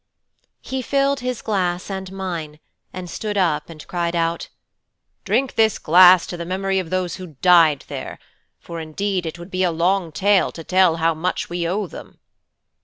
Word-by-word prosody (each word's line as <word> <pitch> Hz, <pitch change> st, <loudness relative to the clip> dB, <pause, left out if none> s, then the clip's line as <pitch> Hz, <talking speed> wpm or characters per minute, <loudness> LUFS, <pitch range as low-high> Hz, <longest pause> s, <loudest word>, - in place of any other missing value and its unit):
He 265 Hz, 0 st, -3 dB
filled 275 Hz, +2 st, +1 dB
his 250 Hz, -2 st, -4 dB
glass 185 Hz, -3 st, -1 dB
and 190 Hz, -1 st, -5 dB
mine, 170 Hz, -6 st, -5 dB, 0.3 s
and 185 Hz, -1 st, -7 dB
stood 205 Hz, +4 st, -4 dB
up 165 Hz, -6 st, +1 dB
and 155 Hz, -2 st, -11 dB
cried 175 Hz, -1 st, -2 dB
out, 165 Hz, 0 st, -1 dB, 0.8 s
"Drink 270 Hz, -1 st, +1 dB
this 220 Hz, -2 st, +3 dB
glass 180 Hz, +2 st, +6 dB
to 175 Hz, -, -6 dB
the 170 Hz, -, -5 dB
memory 190 Hz, +2 st, -1 dB
of 180 Hz, -3 st, -5 dB
those 185 Hz, -1 st, -2 dB
who 180 Hz, -5 st, -10 dB
died 165 Hz, -6 st, +5 dB
there, -, -, -6 dB, 0.4 s
for 170 Hz, -1 st, -8 dB
indeed 180 Hz, +3 st, -2 dB
it 160 Hz, -, -6 dB
would 175 Hz, +2 st, -11 dB
be 185 Hz, -, -2 dB
a 180 Hz, -, +3 dB
long 170 Hz, +1 st, 0 dB
tale 200 Hz, +4 st, +2 dB
to 165 Hz, -, -8 dB
tell 185 Hz, -1 st, +3 dB
how 165 Hz, 0 st, +1 dB
much 170 Hz, +2 st, -3 dB
we 175 Hz, -1 st, -1 dB
owe 200 Hz, +4 st, -1 dB
them." -, -, -11 dB
180 Hz, 180 wpm, -21 LUFS, 165-195 Hz, 0.8 s, glass